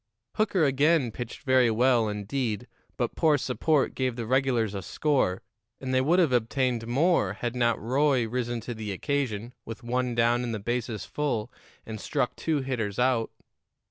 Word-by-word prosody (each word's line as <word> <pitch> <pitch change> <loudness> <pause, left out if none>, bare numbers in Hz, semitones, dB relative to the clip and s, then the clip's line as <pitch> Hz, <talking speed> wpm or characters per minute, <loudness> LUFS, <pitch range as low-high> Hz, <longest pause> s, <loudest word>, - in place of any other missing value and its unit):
Hooker 205 -5 +1
again 140 -1 +3
pitched 120 +4 -7
very 130 -3 +4
well, 120 0 +3
indeed, 105 +2 -3 0.3
but - - -1
poor 155 -2 +3
support 140 +2 +1
gave 130 -2 -1
the 120 -1 -4
regulars 125 -4 +1
a 100 - -4
score, 115 - 0 0.4
and 130 -1 -3
they 130 - +4
would 160 +7 +3
have 170 -7 +4
obtained 120 0 0
more 135 - +2
had 120 +3 -4
not 120 -2 +2
Roy 130 0 +2
risen 120 0 -2
to 120 +2 -5
the 110 -2 -5
occasion, 120 0 -2
with 115 +1 -8
one 125 0 -1
down 120 +1 +2
and 115 -2 -2
the - - -4
bases 115 0 -3
full, 130 -6 -2 0.3
and 110 -1 -7
struck 125 - -1
two 155 -3 -1
hitters 115 -7 -3
out. 125 -2 +2
125 Hz, 170 wpm, -27 LUFS, 115-135 Hz, 0.4 s, very